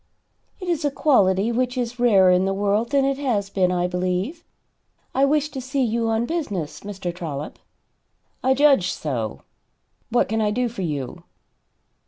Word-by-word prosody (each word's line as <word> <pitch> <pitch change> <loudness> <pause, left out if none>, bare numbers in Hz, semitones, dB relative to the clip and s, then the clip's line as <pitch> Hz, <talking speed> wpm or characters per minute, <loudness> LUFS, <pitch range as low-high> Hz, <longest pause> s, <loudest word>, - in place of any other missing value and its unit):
"It 365 - -7
is 335 -3 0
a 290 - +2
quality 225 -8 +3
which 250 +2 -1
is 245 0 -3
rarer 195 -7 +5
in 180 +1 +3
the 195 0 0
world 205 +3 +1
than 275 -1 +2
it 275 0 0
has 210 -8 -1
been, 185 -2 +2
I 180 -1 +1
believe. 185 - -2 0.7
I 270 - +3
wished 300 +1 +1
to 265 - -4
see 265 +1 -1
you 230 -1 0
on 225 +1 +1
business, 205 - -3
Mr. 195 -3 -5
Trollop." 155 -4 -6 0.8
"I 265 +1 +3
judged 275 -9 +4
so. 120 -8 -4 0.7
What 240 - +2
can 220 +1 -1
I 210 - +2
do 245 +4 0
for 230 -3 -7
you?" 145 -7 -4
225 Hz, 170 wpm, -23 LUFS, 185-265 Hz, 0.8 s, rarer